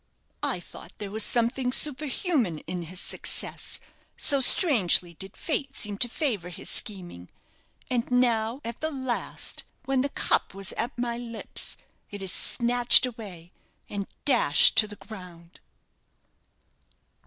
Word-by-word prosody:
I - - -1
thought - - -13
there 205 -2 -7
was 220 +1 0
something 245 +3 0
superhuman 280 - -1
in 180 +1 -5
his 175 +2 -7
success, - - -1 0.4
so 280 - +4
strangely 205 - +5
did 190 +4 -7
fate 275 -4 -3
seem 205 -2 -1
to 245 - +1
favour 225 - -2
his 175 - -5
scheming; 175 - -1 0.6
and 240 -2 -2
now, 240 0 0
at 235 0 -6
the 315 - -1
last 260 -5 -3 0.2
when 270 -1 0
the 280 - -2
cup 195 - 0
was 195 -1 0
at 240 +3 -4
my 240 -1 -3
lips 235 -2 -5 0.3
it 205 -1 -7
is 190 - 0
snatched 245 +1 +4
away, 195 -8 -9 0.4
and 200 -1 -5 0.2
dashed 240 - +6
to 220 -1 +7
the 205 - -10
ground!" 180 -5 -13
230 Hz, 135 wpm, -26 LUFS, 190-255 Hz, 0.6 s, to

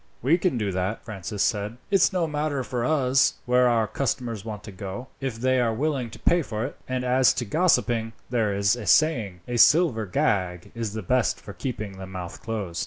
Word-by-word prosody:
"We 160 +8 +3
can 170 -7 +1
do 105 -3 -1
that," 95 +4 -3
Francis 105 -1 -3
said. 105 +1 -1
"It's 195 -2 +4
no 180 -3 +1
matter 150 -3 -2
to 125 - -5
us 135 0 +2
where 125 0 +4
our 115 -2 +2
customers 120 -4 -2
want 105 -2 -7
to 105 - -9
go, 100 +7 -7
if 135 -4 -3
they 130 +1 +2
are 115 -2 +2
willing 135 -2 -1
to - - -11
pay 175 0 +2
for 110 -5 -3
it; 140 - -6
and 130 0 -2
as 125 +1 +4
to 120 - -2
gossiping, 120 - +1
there 115 -4 0
is 100 +2 +2
a 120 -4 -7
saying, 115 - +3
'A 120 -1 -2
silver 130 - +5
gag 90 -1 -1
is 115 -3 -4
the 110 -1 -4
best 125 +6 +1
for 100 - -10
keeping 105 -6 -5
the 95 - -7
mouth 90 -2 -7
closed.'" 100 -7 -4
115 Hz, 205 wpm, -25 LUFS, 105-130 Hz, -, silver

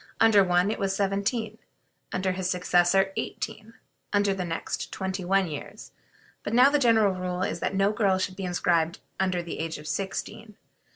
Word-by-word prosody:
Under 220 -3 +6
one 180 +2 +2
it - - -4
was 195 -1 0
seventeen, 205 +3 -1 0.5
under 185 0 0
his 185 0 -2
successor 180 +1 +2
eighteen, 225 +1 -5 0.4
under 205 -1 +2
the 190 -1 -3
next 165 -1 -4
twenty 190 -1 -3
one 195 +2 +2
years; 150 -3 -8 0.5
but 220 - -3
now 255 +3 +7
the 295 - +3
general 225 -6 +4
rule 180 0 -3
is - - -2
that - - -2
no 195 +1 +3
girl 200 -4 +2
should 185 0 -2
be 195 - -6
inscribed 170 -2 +1 0.2
under 185 -2 0
the 170 - -6
age 160 0 -3
of 150 0 -10
sixteen. 195 +5 -4
190 Hz, 175 wpm, -26 LUFS, 180-205 Hz, 0.5 s, now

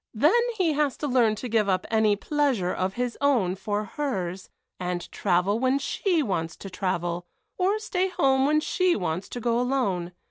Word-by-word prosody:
Then 295 - +4 0.2
he 345 -5 +2
has 290 -2 0
to 295 - -3
learn 240 -5 +3
to 250 - -5
give 220 -3 +1
up 185 -1 +1
any 220 -2 +3
pleasure 260 -6 0
of 185 +1 -2
his 245 -1 -3
own 245 -11 +2
for 205 +2 -2
hers 195 -7 -4 0.3
and 180 -1 -4
travel 195 +3 +1
when 260 +2 +2
she 325 +4 0
wants 165 -8 -2
to 195 - -9
travel, 175 -2 -2 0.3
or 385 +3 +2
stay 380 -4 -1
home 270 -6 +2
when 305 +1 +3
she 365 +2 +1
wants 175 0 -3
to 245 - -5
go 235 0 +1
alone. 205 -9 -1
225 Hz, 180 wpm, -26 LUFS, 185-280 Hz, 0.3 s, Then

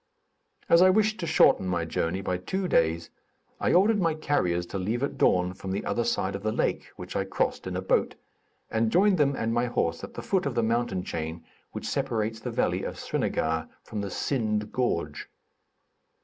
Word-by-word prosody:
As 170 - +6
I 185 - +7
wished 215 +2 +2
to 170 - -3
shorten 95 - +4
my 85 -2 0
journey 85 +3 -1
by 90 -2 -1
two 185 - -2
days, 80 - +1 0.5
I - - +1
ordered 205 +3 +4
my 165 -3 +2
carriers 90 - 0
to 100 - -1
leave 110 +7 -1
at 140 - -2
dawn 90 0 +2
from 95 +1 -8
the 95 - -2
other 120 - 0
side 95 -3 0
of 100 - -5
the 110 +1 -1
lake, - - -1
which - - -8
I - - +1
crossed - - -2
in 90 - -4
a 90 - -2
boat, - - +1 0.6
and 110 0 +1
joined 190 -1 +4
them 140 -1 +3
and 115 -2 -1
my 120 +1 +1
horse 85 -8 -1
at - - -8
the - - -6
foot 190 -6 0
of 130 - -3
the 115 - +2
mountain 115 -5 0
chain 80 0 -5 0.3
which - - -6
separates 110 0 -1
the - - -5
valley - - 0
of - - -5
Srinagar 80 0 -1
from 105 -3 -5
the 100 - -4
Sind 105 -2 -1
gorge. 125 -1 -2
110 Hz, 200 wpm, -27 LUFS, 90-140 Hz, 0.6 s, I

